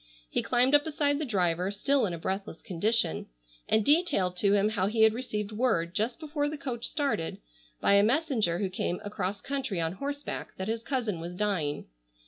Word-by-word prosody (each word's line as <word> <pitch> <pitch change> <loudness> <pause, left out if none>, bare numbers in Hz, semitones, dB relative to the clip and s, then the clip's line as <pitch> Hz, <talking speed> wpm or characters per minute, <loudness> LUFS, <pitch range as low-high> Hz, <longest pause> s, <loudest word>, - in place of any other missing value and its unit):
He - - +1
climbed 250 +2 +3
up 290 0 +6
beside 290 -2 0
the 310 - -1
driver, 180 -5 +1
still 260 +5 +1
in 175 - -3
a - - -6
breathless 190 0 -4
condition, 195 0 0 0.4
and 220 -1 +3
detailed 285 - +3
to 200 +1 +3
him 205 +1 +3
how 200 -3 0
he 220 +1 +3
had 220 0 +6
received 215 -4 -3
word, 210 -7 +1
just 230 +7 -1
before 295 -2 -1
the 305 - -5
coach 245 -5 -3
started, 280 - -1 0.4
by - - +3
a 200 0 +6
messenger 235 - +2
who 195 0 -1
came 180 -1 -2
across 205 -1 -3
country 265 -9 -2
on 165 -1 0
horseback, 285 +7 -5
that 190 - -4
his 225 +1 -1
cousin 230 -8 -2
was 170 +2 -6
dying. 180 -8 -1
215 Hz, 190 wpm, -29 LUFS, 190-275 Hz, 0.4 s, up